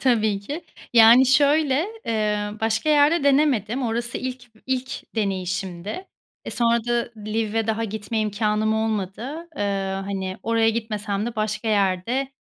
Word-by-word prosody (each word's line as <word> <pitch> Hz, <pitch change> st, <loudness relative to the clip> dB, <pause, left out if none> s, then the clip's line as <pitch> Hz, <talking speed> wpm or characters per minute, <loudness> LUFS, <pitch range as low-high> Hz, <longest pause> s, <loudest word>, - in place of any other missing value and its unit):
Tabii 220 Hz, -6 st, +2 dB
ki. 290 Hz, +11 st, -6 dB, 0.3 s
Yani, 235 Hz, +3 st, +8 dB
şöyle, 290 Hz, +2 st, +3 dB, 0.2 s
eee, 210 Hz, -2 st, 0 dB
başka 225 Hz, +5 st, 0 dB
yerde 295 Hz, +1 st, +4 dB
denemedim. 270 Hz, -4 st, +2 dB
Orası 235 Hz, 0 st, -2 dB
ilk 250 Hz, -2 st, -7 dB
b -, -, -22 dB
ilk 260 Hz, -1 st, -4 dB
deneyişimdi. 195 Hz, -, -3 dB, 0.4 s
E, -, -, -5 dB
sonra 235 Hz, -1 st, +1 dB
da 240 Hz, -1 st, 0 dB
Lviv'e 220 Hz, +1 st, -1 dB
daha 225 Hz, 0 st, 0 dB
gitme 220 Hz, +1 st, -4 dB
imkânım 215 Hz, +1 st, 0 dB
olmadı. 220 Hz, -, -3 dB
Iıı, 195 Hz, -1 st, -1 dB
hani, 190 Hz, -1 st, -4 dB
oraya 225 Hz, 0 st, +2 dB
gitmesem 215 Hz, -2 st, -3 dB
de 240 Hz, -, -5 dB
başka 215 Hz, +1 st, -2 dB
yerde, 210 Hz, +7 st, 0 dB
225 Hz, 135 wpm, -23 LUFS, 210-255 Hz, 0.4 s, Yani